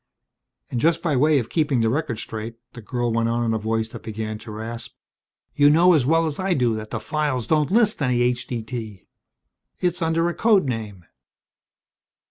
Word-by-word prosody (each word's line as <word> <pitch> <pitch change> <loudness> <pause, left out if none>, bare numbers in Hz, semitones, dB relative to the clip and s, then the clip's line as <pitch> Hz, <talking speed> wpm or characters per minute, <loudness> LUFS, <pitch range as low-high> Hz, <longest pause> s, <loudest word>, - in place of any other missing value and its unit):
"And 125 - -1
just 165 0 +2
by 160 -5 +1
way 150 +3 +4
of 120 -4 -1
keeping 150 -7 +1
the 115 - +2
record 140 -4 -2
straight," 110 +1 -6 0.2
the 120 - -9
girl 120 +1 -2
went 115 0 +1
on 120 0 0
in 115 - +1
a 110 - 0
voice 110 +1 -1
that - - -9
began 110 -1 -5
to 115 - -11
rasp, 115 +2 -6 0.6
"you 145 0 +5
know 170 +4 +6
as 140 -6 +2
well 165 +2 +3
as 155 -2 -4
I 190 -1 +1
do 120 -4 +2
that 110 0 -5
the 115 - -3
files 140 0 -1
don't 155 -2 +2
list 215 -2 +2
any 125 -3 +2
H.D.T. 120 -4 -3 0.7
It's 180 0 -1
under 165 +1 +1
a 175 - -1
code 215 -4 +3
name." 110 -8 -5
125 Hz, 190 wpm, -23 LUFS, 115-155 Hz, 0.7 s, know